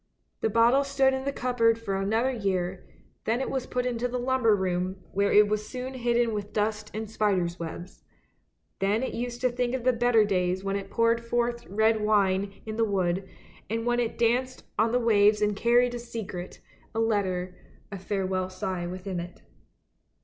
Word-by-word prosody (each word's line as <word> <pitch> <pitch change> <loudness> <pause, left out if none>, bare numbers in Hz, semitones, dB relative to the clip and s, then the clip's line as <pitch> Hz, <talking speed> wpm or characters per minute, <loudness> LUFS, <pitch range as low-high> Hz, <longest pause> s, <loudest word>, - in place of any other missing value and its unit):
The' - - +1
bottle 235 +5 +4
stood 275 -1 +2
in 265 0 -3
the 280 - 0
cupboard 240 -4 +2
for 215 -4 -3
another 220 +7 +1
year, 190 -5 -2 0.4
then 230 +2 +1
it 265 - -2
was 265 -2 -2
put 250 0 -1
into 245 -1 -1
the 250 0 -3
lumber 245 -3 +2
room, 185 -1 -1 0.2
where 200 +1 +1
it 210 0 +6
was 210 0 -2
soon 255 +1 -5
hidden 240 -2 +1
with 205 -1 -5
dust 210 0 -1
and 220 +1 -4
spider's 190 -5 0
webs; 170 +2 -7 0.8
then 205 +5 +1
it - - -3
used 240 0 -4
to 255 - +3
think 245 0 -1
of 255 - -4
the 255 0 +3
better 230 -2 +4
days 185 -1 0
when 195 0 -1
it 195 -1 -4
poured 230 +1 +2
forth 235 0 -1
red 220 +2 +2
wine 200 -2 +1
in 215 0 -5
the 230 - +3
wood, 190 -2 0 0.4
and 225 +1 -2
when 240 0 +1
it 235 -2 -1
danced 250 +2 0
on 225 +1 +2
the 245 - +3
waves 210 -3 +4
and 210 -1 +1
carried 240 +3 +3
a 240 - -4
secret, 205 -6 -7 0.3
a - - 0
letter, 190 -5 0 0.4
a 195 - -6
farewell 190 -1 -2
sigh 185 -1 -3
within 185 0 -5
it. 175 +1 -9
220 Hz, 185 wpm, -27 LUFS, 195-240 Hz, 0.8 s, it